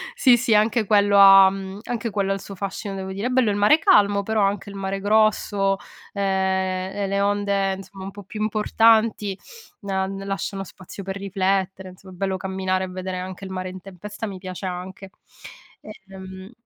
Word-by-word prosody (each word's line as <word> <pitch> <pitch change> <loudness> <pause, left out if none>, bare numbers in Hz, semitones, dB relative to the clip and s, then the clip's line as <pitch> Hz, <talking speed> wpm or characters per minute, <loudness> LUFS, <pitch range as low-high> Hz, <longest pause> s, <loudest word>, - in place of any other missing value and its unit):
Sì, 255 - +5
sì, 235 -1 +1
anche 215 +1 +3
quello 205 -1 +4
ha 195 -1 +9
mhmm, 195 0 -7
anche 235 -1 -3
quello 195 -1 -1
ha - - +3
il 195 - -5
suo 195 - -9
fascino, 195 +1 -5
devo 190 0 -5
dire; 205 +5 -3
è - - -2
bello 250 -4 +2
il 200 - 0
mare 210 +10 +5
calmo, 205 - +4
però 220 0 0
anche 200 0 0
il 200 - -10
mare 195 0 -3
grosso, 205 -1 +2 0.3
ehm, 200 - -4 0.8
e 200 -1 -1
le 200 +1 0
onde, 200 -1 0
insomma, 195 0 -11
un 195 - -6
po' 205 0 -11
più 210 +3 -8
importanti, 215 -1 +2 0.5
a 190 -1 0
ne 195 0 -6
lasciano 195 0 -4
spazio 185 +3 -11
per 190 0 -5
riflettere, 190 -1 -2
insomma 185 +1 -15
è - - -12
bello 190 +1 -2
camminare, 190 0 -2
e - - -8
vedere 185 0 -5
anche 185 +1 -7
il 190 - -8
mare 185 0 -4
in 185 0 -9
tempesta, 200 +4 -8
mi 195 -2 -7
piace, 185 0 -7
anche. 185 +1 -7 1.0
Ehm 190 +1 -10
195 Hz, 195 wpm, -23 LUFS, 190-205 Hz, 1.0 s, ha